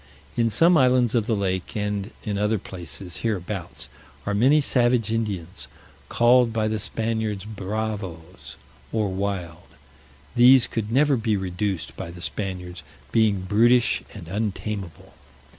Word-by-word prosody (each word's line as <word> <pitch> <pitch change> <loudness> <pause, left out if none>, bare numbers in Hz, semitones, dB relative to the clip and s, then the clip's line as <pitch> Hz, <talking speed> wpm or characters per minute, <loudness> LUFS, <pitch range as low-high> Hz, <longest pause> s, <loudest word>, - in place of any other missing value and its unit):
In 115 -1 +2
some 165 - +5
islands 125 -3 +3
of 115 -3 +1
the 115 - +2
lake, 95 -1 -2
and 105 -1 -2
in 105 -2 -2
other 105 +1 +1
places 90 -2 -8
hereabouts, 100 -4 -3 0.4
are 100 - -1
many 130 +9 +5
savage 120 -5 +2
Indians, 95 -9 -3 0.4
called 120 0 +4
by 110 -1 0
the 110 0 -1
Spaniards 110 -2 -2
bravoes, 100 -4 -5 0.4
or 110 -3 0
wild: 95 -3 -4 0.6
these 125 +1 +7
could 110 -1 -3
never 140 +3 +4
be 110 -2 0
reduced 95 -1 -3
by - - -6
the 85 +1 -10
Spaniards, 90 -1 -4 0.3
being 110 -4 +3
brutish, 115 +5 +3
and 95 -6 -10
untameable. 100 -3 -4
105 Hz, 130 wpm, -24 LUFS, 95-115 Hz, 0.6 s, these